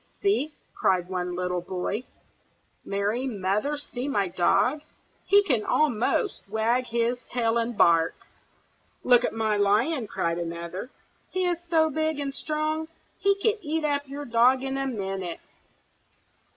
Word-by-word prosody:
"See!" 315 -7 +1 0.2
cried 180 -1 +1
one 180 -1 -2
little 180 0 -1
boy. 190 +6 -3 0.8
"Mary 205 +6 -1
Mother, 210 +6 -1
see 265 -2 -5
my 200 -9 0
dog! 245 - +2 0.4
he 405 0 +6
can 250 - +1
almost 305 - +1
wag 230 +4 +1
his 235 +1 0
tail 235 -1 +1
and 230 -1 -2
bark." 165 -1 +4 0.9
"Look 245 -1 +5
at - - 0
my 220 -1 0
lion!" 220 +6 +2
cried 170 -3 -1
another. 170 +5 -5 0.4
"He 370 0 0
is 350 -1 0
so 315 -2 +3
big 315 +1 0
and 280 -1 -3
strong, 310 +2 -2 0.3
he 400 0 +3
could 440 -1 +2
eat 315 -1 -1
up 285 -1 0
your 285 +2 -6
dog 245 +2 +4
in 270 0 -2
a 270 0 -1
minute." 195 -7 -4
240 Hz, 140 wpm, -26 LUFS, 200-295 Hz, 0.9 s, he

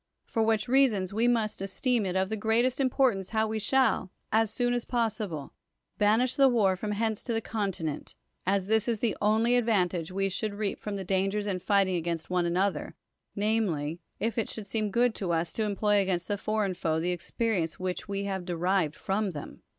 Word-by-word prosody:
For 225 - -1
which 220 +1 +2
reasons 240 -8 +3
we 225 +3 +2
must 225 -5 0
esteem 210 +3 0
it 180 - -2
of 190 0 +1
the 220 - -1
greatest 225 +5 +1
importance 255 -7 +2
how 220 0 +1
we 220 0 -2
shall, 255 -5 +2 0.2
as 220 0 +3
soon 245 +2 0
as 240 -1 -1
possible, 215 - -2 0.5
banish 220 +5 +3
the 275 -1 +6
war 205 -6 +3
from 210 +3 -3
hence 220 0 -1
to 235 - -3
the 225 - +1
continent, 195 -9 -3 0.3
as 195 0 +1
this 220 +2 +2
is 230 -3 0
the 225 -3 0
only 220 +3 +3
advan 225 -7 +3
tage 170 -1 -4
we 195 +1 0
should 200 +2 -3
reap 205 -1 -2
from 210 -1 -4
the 195 - -4
dangers 195 +2 0
in 195 -3 -1
fighting 195 -1 +2
against 170 0 -3
one 180 -1 +2
another, 190 +3 0 0.4
namely, 195 -8 0 0.2
if 230 +2 -1
it 225 - -1
should 220 - -5
seem 215 +1 -1
good 240 +3 +2
to 185 -5 -3
us 170 0 0
to 220 - -1
employ 205 0 +2
against, 180 -3 -1
the 205 - 0
foreign 215 -3 0
foe 160 -3 -1
the 175 +2 0
experience 180 -2 -2
which 185 -1 -3
we 200 0 -2
have 190 -2 -3
derived 175 -2 0
from 200 +1 -1
them. 150 -5 -8
205 Hz, 200 wpm, -28 LUFS, 185-225 Hz, 0.5 s, the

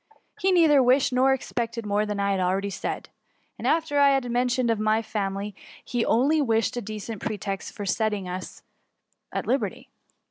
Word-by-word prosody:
He 385 - +2
nettber 315 -6 +5
wish 260 +2 +3
ed - - 0
nor 260 +1 +4
expected 235 -3 -2
more 210 +1 0
than 210 -1 -3
I 200 0 +1
had 195 - 0
akeady 190 +2 0
said. - - -4 0.5
After 320 -3 +1
what - - +5
I 280 - +7
had 270 -3 +1
mentioned 245 0 +1
of 225 - 0
my 215 +1 +2
family^ 200 -1 -3 0.3
he 245 -2 -1
only 280 +9 +3
wished 225 -4 +1
a 245 - -2
decent 215 0 -6
pretext 200 -3 -4
for 205 - -5
setting 205 -1 -1
us 180 +1 -7 0.7
at - - -3
liberty." - - -2
225 Hz, 180 wpm, -25 LUFS, 205-255 Hz, 0.7 s, I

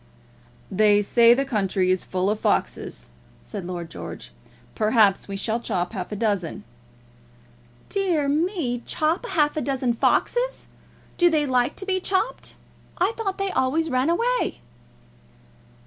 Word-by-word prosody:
"They 205 +1 +4
say 235 +3 +6
the 275 +2 0
country 195 -6 +1
is 185 - 0
full 185 +2 0
of 210 - -2
foxes," - - -2 0.3
said 200 -4 -7
Lord 175 -2 -6
George. - - -8 0.4
"Perhaps 215 -2 +3
we 195 -1 -5
shall 220 +3 -1
chop 185 -5 -2
half 185 -2 -5
a - - -3
dozen." 200 - -1 1.2
"Dear 355 -8 +1
me! 300 - 0
Chop 325 +9 0
half 300 -9 +1
a 305 - -1
dozen 265 -4 0
foxes! - - +1 0.5
Do 350 -1 +6
they 310 -3 +2
like 250 -2 +1
to 390 - -6
be 375 -1 0
chopped? 385 +6 -2 0.4
I 365 +4 +2
thought 395 -4 -3
they 390 -1 -1
always 305 +5 0
ran 255 +4 +2
away." 480 +8 0
255 Hz, 140 wpm, -24 LUFS, 205-345 Hz, 1.2 s, say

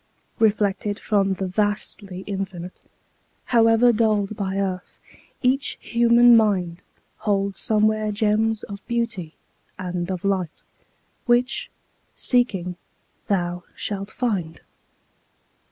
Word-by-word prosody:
Reflected 205 -2 +1
from 195 -3 +1
the 190 - -3
vastly 200 -1 -2
Infinite, 190 -3 -5 0.6
However 230 0 +4
dulled 215 -2 +1
by 195 -2 -3
earth, 185 -2 -3 0.5
each 265 +2 +1
human 235 0 +5
mind 185 -6 +2 0.4
Holds 200 -2 -1
somewhere 215 0 +2
gems 215 +1 +1
of 200 -1 -8
beauty 230 -9 -2 0.4
and 180 -1 -4
of 185 0 -4
light 190 -5 -1 0.6
Which, 250 - +2 0.5
seeking, 190 -8 +1 0.5
thou 175 -3 -1
shalt 200 -1 -4
find. 190 - -2
205 Hz, 95 wpm, -23 LUFS, 190-225 Hz, 0.6 s, human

